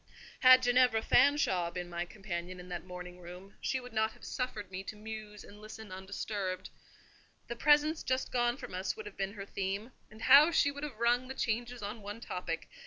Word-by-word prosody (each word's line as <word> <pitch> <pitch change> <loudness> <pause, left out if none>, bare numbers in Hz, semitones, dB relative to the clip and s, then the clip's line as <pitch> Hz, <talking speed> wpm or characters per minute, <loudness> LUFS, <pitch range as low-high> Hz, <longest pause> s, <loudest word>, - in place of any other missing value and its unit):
Had 255 0 +8
Ginevra 245 -2 +4
Fanshawe 190 -12 +4
been 175 0 -5
my 175 0 -3
companion 180 -2 -6
in 180 0 -10
that 180 +1 -6
drawing 180 0 -8
room, 180 +3 -11
she 260 - 0
would 250 -2 -11
not 220 0 +1
have - - -14
suffered 215 -7 -4
me 185 0 -4
to 215 - -6
muse 215 -1 -8
and 205 +1 -14
listen 215 -1 -10
undisturbed. 190 0 -4 0.8
The 235 - -4
presence 300 +4 +4
just 260 0 -1
gone 240 0 +1
from 245 -6 -9
us 185 - -2
would 445 - -7
have 420 - -9
been 195 0 -3
her 200 -2 -7
theme; 200 +4 -3 0.2
and 215 +1 -12
how 285 +4 +8
she 300 -4 +3
would 285 0 -8
have 285 -7 -5
rung 240 +2 +2
the 265 - -6
changes 240 0 -2
on 210 +2 -5
one 205 +2 -7
topic! 180 -7 -4
215 Hz, 200 wpm, -32 LUFS, 190-250 Hz, 0.8 s, Had